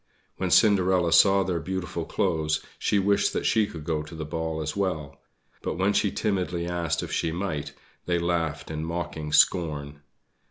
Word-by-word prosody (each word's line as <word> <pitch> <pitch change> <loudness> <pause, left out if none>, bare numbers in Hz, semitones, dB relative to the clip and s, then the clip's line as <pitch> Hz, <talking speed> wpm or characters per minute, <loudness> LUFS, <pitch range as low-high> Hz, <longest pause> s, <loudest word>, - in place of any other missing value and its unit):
When - - -1
Cinderella 95 -5 +4
saw 100 -1 +6
their 90 -2 -1
beautiful 95 +3 -4
clothes 75 -1 0
she 105 - +1
wished 100 +1 +2
that - - -2
she 110 -1 +3
could 80 -5 -8
go 80 -1 -1
to 75 +2 -10
the 80 -1 -5
ball 80 0 -3
as 75 - -4
well; 80 -8 -3 0.4
but - - -3
when 95 +3 +2
she 100 - +2
timidly 90 -5 -1
asked 85 -3 -1
if - - -6
she 80 - 0
might, 85 -4 -3 0.3
they 90 -1 +2
laughed 85 -3 -1
in 80 0 -3
mocking 85 -2 -4
scorn. 75 -4 +2
85 Hz, 170 wpm, -26 LUFS, 80-95 Hz, 0.4 s, saw